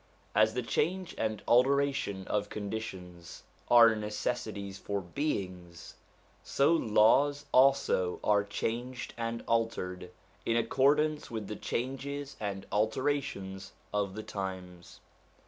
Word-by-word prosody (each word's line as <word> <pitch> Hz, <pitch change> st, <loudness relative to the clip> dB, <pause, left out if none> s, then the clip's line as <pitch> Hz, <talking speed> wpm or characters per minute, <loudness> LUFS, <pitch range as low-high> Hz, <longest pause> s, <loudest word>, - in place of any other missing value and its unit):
As 110 Hz, +2 st, +3 dB
the 125 Hz, -, -1 dB
change 180 Hz, +9 st, -1 dB
and 110 Hz, -1 st, -2 dB
alteration 130 Hz, -6 st, +2 dB
of 105 Hz, 0 st, -1 dB
conditions 95 Hz, -5 st, -7 dB, 0.3 s
are 115 Hz, -2 st, +7 dB
necessities 105 Hz, -2 st, -4 dB
for 100 Hz, 0 st, -2 dB
beings, 90 Hz, -, -4 dB, 0.5 s
so 140 Hz, +4 st, +3 dB
laws 140 Hz, +2 st, +3 dB
also 130 Hz, -9 st, +3 dB
are 105 Hz, -1 st, +3 dB
changed 120 Hz, +4 st, -4 dB
and 115 Hz, 0 st, -3 dB
altered, 90 Hz, -6 st, -1 dB, 0.3 s
in 115 Hz, -, +1 dB
accordance 145 Hz, +6 st, +2 dB
with 110 Hz, -3 st, -4 dB
the 105 Hz, -, -5 dB
changes 135 Hz, +5 st, -4 dB
and 100 Hz, -2 st, -4 dB
alterations 110 Hz, -4 st, -1 dB, 0.2 s
of 100 Hz, -2 st, -1 dB
the 110 Hz, -, -5 dB
times. 95 Hz, -4 st, -7 dB
110 Hz, 110 wpm, -31 LUFS, 100-130 Hz, 0.5 s, are